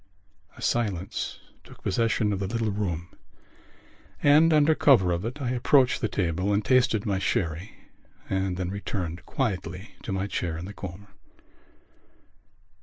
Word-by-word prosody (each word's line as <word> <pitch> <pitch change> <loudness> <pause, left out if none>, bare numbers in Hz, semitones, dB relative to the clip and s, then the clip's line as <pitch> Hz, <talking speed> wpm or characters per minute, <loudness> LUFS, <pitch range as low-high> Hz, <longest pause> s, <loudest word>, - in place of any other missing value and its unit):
A - - -9
silence 100 -6 -1 0.2
took - - -16
possession 110 +1 +1
of 95 - -2
the 95 - -2
little 115 +1 -1
room 90 -4 -3 1.1
and, 155 +3 +6
under 155 0 +5
cover 120 - +5
of 85 +4 -1
it, 125 +5 -4
I 125 -3 -1
approached 130 +1 +3
the 110 - +1
table 90 0 -1
and 100 +1 +1
tasted 125 -5 +3
my 100 -3 0
sherry 85 +1 -2 0.5
and 95 -1 -1
then 90 0 -2
returned 90 -4 -4
quietly 95 -5 -3
to - - -5
my 95 0 -1
chair 85 -5 -3
in 85 - -6
the 100 - -8
corner. 95 +1 -9
100 Hz, 145 wpm, -26 LUFS, 90-120 Hz, 1.1 s, and